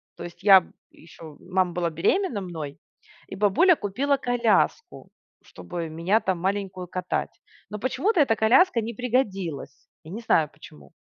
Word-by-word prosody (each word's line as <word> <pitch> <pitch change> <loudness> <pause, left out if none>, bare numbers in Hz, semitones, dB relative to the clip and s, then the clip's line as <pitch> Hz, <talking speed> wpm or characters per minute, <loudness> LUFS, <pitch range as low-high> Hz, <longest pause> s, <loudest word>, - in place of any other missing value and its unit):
То - - -9
есть, 175 +2 -11
я 195 -2 +8
б - - -19 0.2
еще 160 -3 -14
мама 185 -1 -1
была 175 -1 -1
беременна 205 - 0
мной 160 -6 -7 0.5
и - - -8
бабуля 210 - +4
купила 275 +6 -1
коляску, 245 - 0 0.3
чтобы 170 -2 -7
меня 170 +7 +1
там 185 -5 -2
маленькую 190 -1 -3
катать. 185 +1 -4 0.3
Но 210 - -6
почему-то 325 - 0
эта 235 -6 +3
коляска 235 +4 +4
не 230 +2 -5
пригодилась. 195 - -3 0.2
Я 160 - -12
не 225 +4 -6
знаю 155 -9 +2
почему. 75 - -16
195 Hz, 150 wpm, -24 LUFS, 170-235 Hz, 0.5 s, я